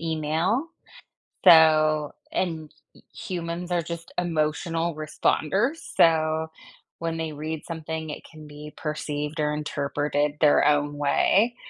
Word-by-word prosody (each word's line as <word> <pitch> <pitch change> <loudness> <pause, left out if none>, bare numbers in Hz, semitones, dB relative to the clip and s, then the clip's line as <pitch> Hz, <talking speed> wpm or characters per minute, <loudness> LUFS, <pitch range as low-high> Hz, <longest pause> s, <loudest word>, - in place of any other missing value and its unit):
email, 165 - -1 0.8
so, 155 -2 +6 0.2
and 160 -4 -2 0.2
h - - -18
humans 175 0 -5
are 175 -1 +2
just 170 0 -8
emotional 165 0 -1
responders, 160 - 0 0.2
so, 160 -1 +3 0.5
when 165 0 -3
they 160 -1 -3
read 155 +1 -5
something 160 -1 -5
it - - -7
can 155 -2 -13
be 150 +1 -10
perceived 150 0 -4
or 150 0 +1
interpreted 145 0 -1
their 145 -1 +5
own 145 0 +1
way. 200 +11 +2
155 Hz, 120 wpm, -25 LUFS, 150-165 Hz, 0.8 s, so